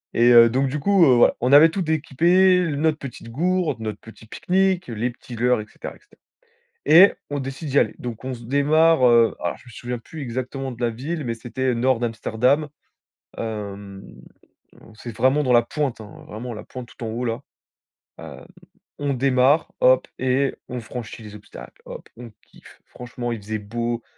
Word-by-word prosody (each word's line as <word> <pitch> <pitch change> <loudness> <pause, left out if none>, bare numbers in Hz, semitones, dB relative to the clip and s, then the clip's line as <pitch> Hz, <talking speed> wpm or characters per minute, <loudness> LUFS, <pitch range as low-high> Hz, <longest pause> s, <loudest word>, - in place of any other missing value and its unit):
Et 120 +1 +4
heu, 115 -1 +8
donc 135 +3 0
du 145 +3 -3
coup, 195 +4 +3
heu, 130 -4 +5
voilà. 120 - +4
On 125 +2 +1
avait 150 +3 +8
tout 185 +4 -3
d'équipé: 170 +4 +3
l 170 -5 0
notre 155 +1 +1
petite 125 -3 -9
gourde, 175 +2 -1
notre 110 -1 -5
petit 115 0 -15
pique-nique, 185 - 0
les 115 +1 -2
petits 120 0 -11
leurres, 120 0 +1
et - - -9
cetera, - - -9
et - - -21
cetera. - - -27 0.6
Et 180 +5 +7 0.2
on 145 0 -3
décide 135 +3 -6
d'y 140 - +3
aller. - - 0
Donc 120 -2 -7
on 130 - -3
se 120 -1 -10
démarre, 145 +3 +3
heu 115 -1 +4
alors - - -3
je - - -21
me - - -13
souviens 120 +1 -6
plus 155 +6 -10
exactement 130 +1 -5
de 120 - -13
la 120 - +2
ville, 145 +8 -5
mais 120 -3 -2
c'était, 120 +3 -8
heu, - - +1
nord 125 0 +1
d'Amsterdam. 120 +5 0 0.7
Hem, 100 -3 -6 0.9
c'est 115 0 -9
vraiment 135 +3 +2
dans 130 -3 +1
la 120 -1 +5
pointe, 135 0 -3
hein, 105 -1 -12
vraiment 120 +3 -7
la 105 - -8
pointe 125 -1 -9
tout 120 - -10
en - - -3
haut 115 +3 -4
là. 115 -1 -2 0.8
Hem, - - -10 0.6
on 145 -1 -1
démarre. 135 +3 +2
Hop! - - +4
Et 130 +1 +1 0.2
on 125 -1 -5
franchit 115 0 -8
les 105 -1 -11
obstacles. 105 - -13
Hop! - - -10
On 120 -2 -10
kiffe. - - -19
Franchement, 120 -1 -7
il 115 - -5
faisait 110 +2 -4
beau, 115 +3 -4
125 Hz, 195 wpm, -22 LUFS, 115-145 Hz, 0.9 s, heu